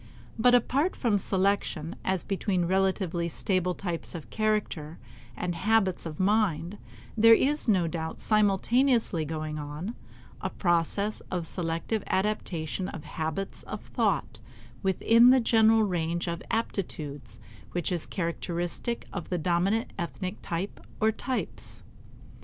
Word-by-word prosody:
But 245 Hz, +2 st, +6 dB
apart 275 Hz, +8 st, +2 dB
from 220 Hz, -5 st, +1 dB
selection 190 Hz, -5 st, 0 dB
as 190 Hz, -2 st, 0 dB
between 190 Hz, -2 st, 0 dB
relatively 185 Hz, -2 st, +1 dB
stable 180 Hz, +1 st, 0 dB
types 175 Hz, -2 st, -4 dB
of 165 Hz, -, -8 dB
character 210 Hz, -8 st, -1 dB, 0.4 s
and 180 Hz, 0 st, -2 dB
habits 195 Hz, -1 st, +1 dB
of 155 Hz, -2 st, -8 dB
mind, 195 Hz, -2 st, +1 dB, 0.4 s
there 225 Hz, +1 st, +8 dB
is 290 Hz, +3 st, +1 dB
no 190 Hz, -6 st, +4 dB
doubt 160 Hz, -1 st, -4 dB
simultaneously 215 Hz, -, +2 dB
going 155 Hz, 0 st, -4 dB
on 150 Hz, +9 st, -5 dB, 0.5 s
a -, -, -1 dB
process 180 Hz, +4 st, 0 dB
of 180 Hz, -3 st, -2 dB
selective 165 Hz, +6 st, -2 dB
adaptation 185 Hz, -3 st, -1 dB
of 155 Hz, -, -7 dB
habits 160 Hz, +4 st, -4 dB
of -, -, -6 dB
thought -, -, -1 dB, 0.4 s
within 230 Hz, +5 st, +5 dB
the 260 Hz, +1 st, +7 dB
general 225 Hz, -1 st, +5 dB
range 170 Hz, -3 st, -1 dB
of 170 Hz, 0 st, -3 dB
aptitudes 145 Hz, -, -3 dB, 0.4 s
which 175 Hz, +1 st, -1 dB
is 175 Hz, -3 st, -2 dB
characteristic 175 Hz, +5 st, -3 dB
of 185 Hz, -5 st, -5 dB
the 180 Hz, -, 0 dB
dominant 180 Hz, +7 st, +1 dB
ethnic 185 Hz, +3 st, -4 dB
type 175 Hz, +4 st, -4 dB, 0.2 s
or 220 Hz, 0 st, +4 dB
types. 255 Hz, +3 st, -5 dB
185 Hz, 125 wpm, -28 LUFS, 170-215 Hz, 0.5 s, there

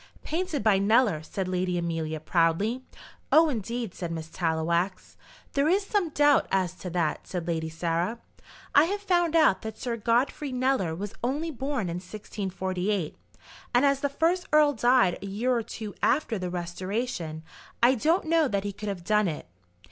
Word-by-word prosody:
"Painted 325 Hz, -, -2 dB
by 205 Hz, -3 st, +4 dB
Kneller," 210 Hz, -4 st, +3 dB
said 185 Hz, +4 st, -4 dB
Lady 180 Hz, -1 st, -1 dB
Amelia, 165 Hz, -2 st, -2 dB
proudly. 175 Hz, +10 st, +1 dB, 0.5 s
"Oh, 320 Hz, 0 st, +6 dB
indeed," 235 Hz, -4 st, -3 dB
said 175 Hz, -3 st, -5 dB
Miss 160 Hz, -1 st, -5 dB
Tallowax. 170 Hz, +3 st, -1 dB, 0.4 s
"There 280 Hz, +1 st, +2 dB
is 390 Hz, +3 st, +2 dB
some 395 Hz, -5 st, 0 dB
doubt 290 Hz, -1 st, +4 dB
as 185 Hz, -2 st, +1 dB
to 180 Hz, -, -6 dB
that," 170 Hz, -3 st, -1 dB
said 175 Hz, -2 st, -4 dB
Lady 160 Hz, -1 st, -1 dB
Sarah. 170 Hz, +6 st, -1 dB, 0.6 s
"I 290 Hz, -, +7 dB
have 400 Hz, +4 st, -2 dB
found 350 Hz, -4 st, +1 dB
out 310 Hz, -12 st, +4 dB
that 220 Hz, -1 st, -6 dB
Sir 240 Hz, -2 st, -3 dB
Godfrey 245 Hz, +5 st, 0 dB
Kneller 255 Hz, -10 st, 0 dB
was 200 Hz, +3 st, -5 dB
only 295 Hz, +7 st, -1 dB
born 270 Hz, -, -2 dB
in 170 Hz, 0 st, -3 dB
1648, 190 Hz, -2 st, -3 dB, 0.6 s
and 250 Hz, +3 st, +5 dB
as 280 Hz, -1 st, +3 dB
the 285 Hz, -, 0 dB
first 345 Hz, +6 st, 0 dB
earl 300 Hz, -1 st, +5 dB
died 240 Hz, -6 st, +3 dB
a -, -, -6 dB
year 235 Hz, +6 st, 0 dB
or 235 Hz, -, +1 dB
two 215 Hz, -2 st, -7 dB
after 255 Hz, -7 st, +1 dB
the 180 Hz, -1 st, -3 dB
restoration, 175 Hz, -1 st, -4 dB, 0.4 s
I 245 Hz, +2 st, +7 dB
don't 320 Hz, -, +1 dB
know 320 Hz, -1 st, +3 dB
that 200 Hz, -5 st, -1 dB
he 205 Hz, -1 st, -3 dB
could 210 Hz, +1 st, -5 dB
have 190 Hz, -3 st, -5 dB
done 210 Hz, +1 st, +2 dB
it." 155 Hz, -3 st, -4 dB
210 Hz, 170 wpm, -27 LUFS, 175-275 Hz, 0.6 s, I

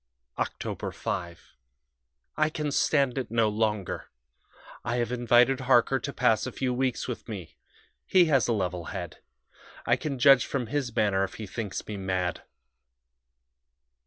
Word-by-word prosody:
"Oct. -, -, -4 dB
5. 85 Hz, -1 st, -5 dB, 0.8 s
I 155 Hz, 0 st, +2 dB
can 150 Hz, -1 st, -3 dB
stand 140 Hz, -2 st, +2 dB
it 125 Hz, -, -4 dB
no 115 Hz, -1 st, +2 dB
longer; 105 Hz, -3 st, -2 dB, 0.7 s
I 120 Hz, 0 st, -1 dB
have 120 Hz, -1 st, -1 dB
invited 120 Hz, +2 st, +4 dB
Harker 130 Hz, 0 st, +3 dB
to 140 Hz, -, -4 dB
pass 125 Hz, -3 st, +2 dB
a -, -, -4 dB
few 130 Hz, -1 st, -1 dB
weeks 130 Hz, -1 st, -1 dB
with 125 Hz, -1 st, -6 dB
me 95 Hz, -7 st, -7 dB, 0.5 s
he 185 Hz, -2 st, +5 dB
has 135 Hz, -8 st, +3 dB
a -, -, +1 dB
level 90 Hz, -4 st, -2 dB
head. 90 Hz, -3 st, -6 dB, 0.7 s
I -, -, +3 dB
can 140 Hz, -3 st, -3 dB
judge 130 Hz, 0 st, +6 dB
from 135 Hz, -3 st, -2 dB
his 125 Hz, -1 st, -3 dB
manner 100 Hz, -2 st, +2 dB
if 95 Hz, -, -4 dB
he 110 Hz, -, -6 dB
thinks 100 Hz, -1 st, -5 dB
me 105 Hz, -, -5 dB
mad. 95 Hz, -2 st, -2 dB
120 Hz, 150 wpm, -27 LUFS, 100-130 Hz, 0.8 s, judge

